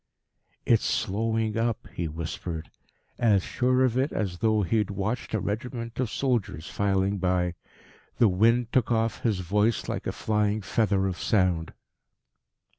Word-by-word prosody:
"It's 115 -2 +4
slowing 110 +1 0
up," 115 -1 -1
he 85 - -2
whispered, 80 +1 -5 0.5
as 105 -5 +4
sure 130 +1 +1
of 125 0 +1
it 135 +3 +1
as 95 -5 -2
though 110 -2 +2
he 95 +5 +1
had 105 - -1
watched 100 +4 -2
a - - +1
regiment 115 +2 -4
of 130 -4 0
soldiers 115 - -1
filing 100 0 0
by. 90 -1 +1 0.6
The 115 - +5
wind 115 +5 +3
took 125 -2 +2
off 115 0 0
his 105 -6 0
voice 105 +5 +1
like - - -3
a - - 0
flying 105 -1 0
feather 100 -1 +1
of 95 -2 -2
sound. 90 -6 +1
105 Hz, 150 wpm, -27 LUFS, 95-115 Hz, 0.6 s, The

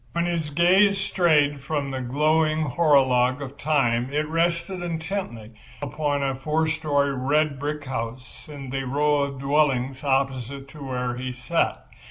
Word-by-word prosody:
When 170 0 0
his 170 -3 -2
gaze 185 +6 +4
strayed 150 -7 +2
from 140 -1 -2
the 130 -1 -3
glowing 155 +4 +1
horologue 130 -3 +3
of 140 -1 -7
time 130 -4 +1
it 150 +1 0
rested 170 +3 -1
intently 160 - -4 0.3
upon 145 0 -1
a 135 -1 0
four 150 +4 0
story 150 -3 0
red 140 +2 +1
brick 150 0 -4
house 130 +2 -6
in 140 -3 -8
the 135 0 -2
row 145 +3 +1
of 140 -1 -3
dwellings 135 -2 +1
opposite 135 -1 -1
to 150 0 -10
where 125 -2 -3
he 130 0 -4
sat. 125 0 -1
145 Hz, 150 wpm, -24 LUFS, 130-155 Hz, 0.3 s, gaze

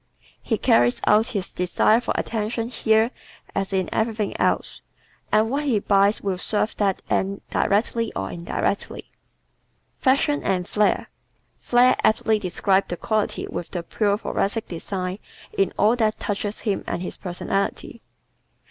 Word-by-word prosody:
He - - -1
carries 120 +1 +3
out 215 +2 +4
his 190 - -4
desire 180 +5 +2
for - - -2
attention 225 +1 -2
here 225 -1 +2 0.4
as 195 0 -2
in 190 -2 0
everything 220 -2 -1
else - - 0 0.5
and 215 +1 +4
what 280 +5 -1
he 255 -6 +2
buys 200 +1 +3
will 190 -2 -1
serve 210 +3 0
that 195 -2 0
end 195 +1 0
directly 225 +2 +1
or 95 0 -3
indirectly. 170 +3 -3 0.9
Fashion 280 +2 +2
and 185 -2 -1
"Flare" 210 0 +1 0.6
¶ - - -36
"Flare" 250 +1 +5
aptly 220 0 +3
describes 190 0 +1
the 175 - -4
quality 215 +1 -1
which 175 - -6
the 175 -2 -4
pure 205 +3 0
Thoracic 220 0 -1
desires 185 +2 -4 0.4
in 395 -1 +2
all 215 +3 +4
that 220 -3 0
touches 205 0 -3
him 205 -4 -1
and 175 - -2
his - - -6
personality. 195 +2 -3
210 Hz, 145 wpm, -23 LUFS, 190-225 Hz, 0.9 s, Flare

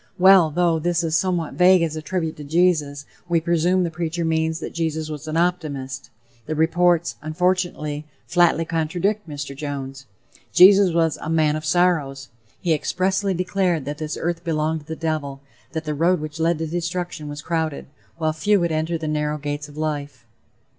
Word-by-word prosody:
Well, 185 -3 +7
though 170 +1 +1
this 175 +1 0
is 160 -1 0
somewhat 175 -3 0
vague 180 -1 +5
as 160 -2 -2
a 155 - -4
tribute 160 -1 -3
to 150 - -8
Jesus, 150 -3 +1 0.2
we 170 -1 +3
presume 170 +2 +2
the 170 - -2
preacher 170 +1 -3
means 160 0 0
that - - -6
Jesus 160 -1 -2
was 150 +1 -7
an 155 +1 -2
optimist. 145 -6 -2 0.4
The 155 - -2
reports, 170 +2 +2
unfortunately, 155 -2 -1 0.2
flatly 175 -2 +3
contradict 175 +5 -1
Mr. 145 -1 -6
Jones. 135 -2 -6 0.5
Jesus 195 0 +7
was 165 -2 +1
a - - -5
"man 155 -2 +2
of 155 0 -5
sorrows." 150 -5 +1 0.3
He 170 -3 +2
expressly 190 +5 0
declared 180 -3 0
that 145 +2 -5
this 155 -1 -4
earth 170 0 -2
belonged 160 -1 -1
to 150 - -17
the 160 - -4
devil, 155 -4 -3 0.3
that 160 0 -3
the 150 - -2
road 170 +4 +2
which 155 +1 -7
led 165 0 +2
to 160 - -3
destruction 175 -1 -4
was 145 0 -7
crowded, 160 -3 -2 0.3
while 155 -1 0
few 200 +6 +2
would 170 -1 0
enter 160 +2 -1
the 160 -1 -5
narrow 150 0 -1
gates 145 0 -5
of 145 - -14
life. 145 -5 -4
160 Hz, 180 wpm, -22 LUFS, 150-175 Hz, 0.5 s, Well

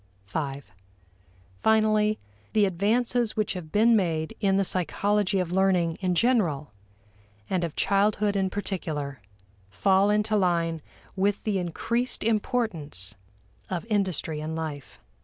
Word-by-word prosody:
(v) 140 +5 -4 1.0
Finally, 215 -1 +3 0.4
the 210 -2 +4
advances 225 +5 +1
which 215 - 0
have 170 -5 -7
been 225 +2 +5
made 165 -6 0
in 195 -2 +2
the 195 - +2
psychology 200 +3 0
of 180 -2 -1
learning 180 -3 +2
in 180 -2 +1
general 175 - +1 0.8
and 185 -2 +1
of 165 -3 -3
childhood 205 +1 +2
in 190 -1 +1
particular 155 - -4 0.5
fall 190 - +3
into 210 +1 +2
line 170 -4 +1 0.3
with 200 +1 0
the 205 -3 0
increased 235 +8 -2
importance 210 - -1 0.6
of 185 +1 -3
industry 185 -6 0
in 155 +1 -4
life. 155 -4 -6
190 Hz, 120 wpm, -26 LUFS, 165-210 Hz, 1.0 s, been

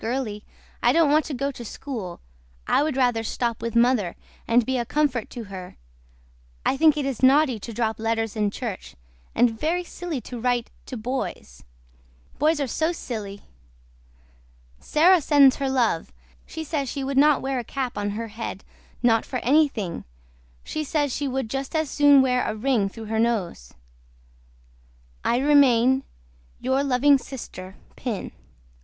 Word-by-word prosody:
GIRLY 225 -3 -3 0.4
I - - +4
DON'T 325 -3 +4
WANT 310 0 +3
TO 295 - -4
GO 275 +3 -1
TO 245 - -9
SKOOL 220 -7 -7 0.4
I - - +3
WOOD 300 -2 -1
RATHER 245 -3 +2
STOP 230 0 -2
WITH 230 0 -4
MOTHER 235 -6 +2 0.3
AND 235 0 +3
BE 260 +1 0
A - - 0
CUMFERT 260 -2 0
TO 240 - -7
HER 190 -3 -9 0.9
I - - +2
THINK 310 +1 +4
IT 290 - -1
IS 270 -4 -3
NAUTY 265 -2 +4
TO 230 - -7
DROP 220 0 -2
LETTERS 225 -1 -1
IN 210 -1 +1
CHERCH 215 -2 -6 0.4
AND 230 -2 +2
VERRY 345 +4 0
SILY 345 -4 -5
TO 245 0 -8
RITE 245 0 0 0.2
TO 255 - -6
BOYS 230 - -5 0.8
BOYS 305 +2 +2
ARE 280 - 0
SO 315 +6 0
SILY 210 - -6 1.4
SARAH 345 +3 +4
SENDS 285 -2 +5
HER 275 -1 -1
LUV 235 -10 0 0.4
SHE 320 - -6
SAYS 290 -4 -2
SHE 275 - -4
WOOD 270 0 -2
NOT 295 0 +4
WARE 265 -1 -1
A - - -4
CAP 255 +1 -4
ON 205 0 -2
HER 225 +2 -4
HED 215 -2 -6 0.4
NOT 225 -2 +4
FOR 255 - -4
ANNYTHING 265 - +1 0.6
SHE 310 - -3
SAYS 290 -2 0
SHE 290 - -2
WOOD 265 -2 -2
JUST 270 +6 -4
AS 315 -3 0
SOON 285 -2 +6
WARE 250 -1 +2
A 215 - -2
RING 220 -3 +1
THRUGH 225 +2 -9
HER 220 +1 -2
NOSE. 205 - -1 1.5
I 240 - +2
REMAIN 265 -2 +4 0.6
YOUR 260 +2 +1
LUVING 275 +1 +4
SISTER 190 -9 -9 0.2
PIN. 230 -6 -4
255 Hz, 160 wpm, -24 LUFS, 225-280 Hz, 1.5 s, SOON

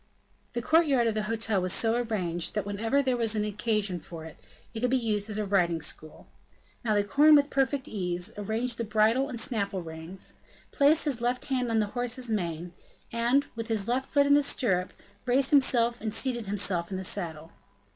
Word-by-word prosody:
The 240 -1 -3
courtyard 295 -6 +3
of 225 - +1
the 215 - -1
hotel 225 -3 +1
was 185 0 0
so 225 -1 +2
arranged, 200 -9 -2
that 210 - -1
whenever 225 +7 0
there 260 -2 +1
was 225 -2 +1
any 210 0 0
occasion 210 -3 -1
for 160 0 -10
it, 160 - -10 0.4
it 225 - -5
could 250 +2 +1
be 260 - +3
used 215 -3 0
as 210 - -1
a 215 - -1
riding 175 -4 +1
school. 155 0 -5 0.6
Malicorne, 235 +8 +4
with 285 0 +3
perfect 270 0 0
ease, 180 -1 -2
arranged 225 +4 -2
the - - 0
bridle 220 +5 +2
and 240 - -4
snaffle 200 -6 -1
reins, 160 +3 -7 0.4
placed 300 +3 +4
his 265 -6 -1
left 245 +1 -1
hand 255 -4 -1
on 225 - +1
the 215 - +2
horse's 245 0 -2
mane, 175 -4 -3 0.4
and, 240 +5 +2
with 230 -1 -5
his 220 -4 0
foot 265 +4 +1
in 285 - +4
the 290 - +5
stirrup, 195 -10 0 0.4
raised 260 +2 +2
himself 240 -4 +3
and 220 0 -2
seated 240 -5 0
himself 185 -4 -1
in 190 - -4
the 190 - -5
saddle. 165 -4 -4
225 Hz, 190 wpm, -28 LUFS, 195-250 Hz, 0.6 s, the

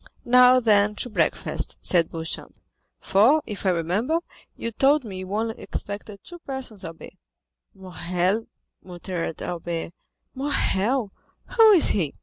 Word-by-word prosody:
"Now, 250 +1 +6
then, 210 -3 +3
to 245 - -5
breakfast," - - -1
said 170 -3 +2
Beauchamp; 165 -1 -6 0.4
"for, 245 +11 +3
if 205 -2 -5
I - - +5
remember, 190 - 0 0.4
you 230 - -4
told 275 +6 +3
me 195 -5 -7
you 185 0 -7
only 220 +2 -2
expected 200 0 -6
two 350 -1 -11
persons, 265 - -7
Albert." 165 0 -9 0.6
"Morrel," 185 +2 -2 0.3
muttered 175 -2 -5
Albert—"Morrel—who 220 - -1
is 350 - +6
he?" 165 -8 -1
210 Hz, 120 wpm, -24 LUFS, 180-255 Hz, 0.6 s, Now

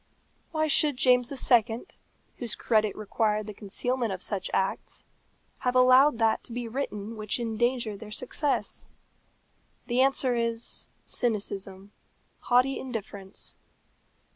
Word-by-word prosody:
Why 310 -1 +1
should 295 -2 +3
James 250 -1 +4 0.2
II., 230 -1 +4 0.5
whose 235 -4 -1
credit 215 -3 +1
required 215 0 0
the 210 - -7
concealment 230 +4 0
of 185 -1 -5
such 195 -3 -1
acts, 190 - -2 0.5
have 250 0 0
allowed 255 +1 +6
that 225 -1 +2
to - - -12
be 240 0 -3
written 225 -3 -4
which 215 +1 -2
endangered 235 -2 -1
their 220 - -9
success? 255 +5 -2 1.0
The 245 +1 +2
answer 270 -1 +3
is, 230 0 -2 0.2
cynicism 200 -3 -2 0.5
haughty 250 +2 +2
indifference. 205 -6 -6
230 Hz, 115 wpm, -28 LUFS, 210-255 Hz, 1.0 s, allowed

